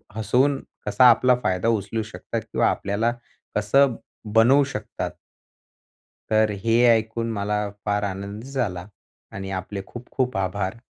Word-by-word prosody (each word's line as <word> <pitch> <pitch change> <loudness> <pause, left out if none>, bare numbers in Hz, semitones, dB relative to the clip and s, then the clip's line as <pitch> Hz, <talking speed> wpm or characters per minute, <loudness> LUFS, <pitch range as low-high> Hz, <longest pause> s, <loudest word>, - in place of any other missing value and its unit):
हसवून 125 +6 +2 0.3
कसा 125 -1 +6
आपला 125 +2 +5
फायदा 90 +3 0
उचलू 110 0 0
शकतात 110 - -5
किंवा - - +2
आपल्याला 105 +4 0 0.4
कसं 120 +5 +3 0.4
बनवू 125 +6 +6
शकतात. 110 -6 -5 1.2
तर 110 0 +4
हे 115 +1 +3
ऐकून 115 +1 -2
मला 105 -1 -1 0.3
फार 105 0 0
आनंद 100 +2 -5
झाला 105 -9 -3 0.5
आणि 95 0 -5
आपले 100 +1 -6
खूप 120 0 -10
खूप 125 -5 -1
आभार. 95 +2 -2
110 Hz, 125 wpm, -24 LUFS, 100-120 Hz, 1.2 s, कसा